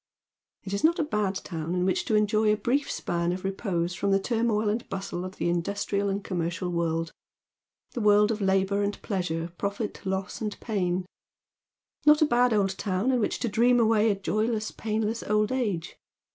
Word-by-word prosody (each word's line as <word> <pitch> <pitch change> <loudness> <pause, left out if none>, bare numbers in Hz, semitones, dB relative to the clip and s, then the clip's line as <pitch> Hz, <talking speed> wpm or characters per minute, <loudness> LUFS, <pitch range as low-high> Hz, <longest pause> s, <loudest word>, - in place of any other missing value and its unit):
It 195 - -6
is 200 - -2
not 335 +3 +4
a 325 - +1
bad 210 -8 -1
town 170 -2 -4
in 180 0 +1
which 185 - 0
to 220 - +1
enjoy 215 0 +3
a 210 - +2
brief 255 +7 0
span 170 0 -1
of 185 +1 -4
repose 190 -3 -1
fi 200 - -2
om - - +2
the 195 - +4
turmoil 225 0 0
and 220 +3 -1
bustle 195 -2 -4
of 185 0 -7
the - - -2
industrial 200 +3 -1
and 195 +1 -2
commercial 175 -1 -2
world; 165 -1 -1 0.4
— - - -56
the 245 - -3
world 210 +1 +5
of 215 -1 -3
labour 195 +1 +2
and 205 0 -2
pleasure, 170 -4 -2
profit, 200 +2 -3
loss, 190 +2 -3
and 210 -2 -3
pain 185 -4 -1 1.0
Not 300 0 +6
a 310 - +5
bad 245 -3 +3
old 195 -3 +1
town 195 +5 0
in 250 - +2
which 215 - 0
to 245 - 0
dream 240 +3 +3
away 220 -1 +4
a 205 - +2
joyless, 215 +2 -1
painless 220 +1 -2
old 210 +1 +1
age. 215 -10 -2
205 Hz, 195 wpm, -27 LUFS, 185-220 Hz, 1.0 s, Not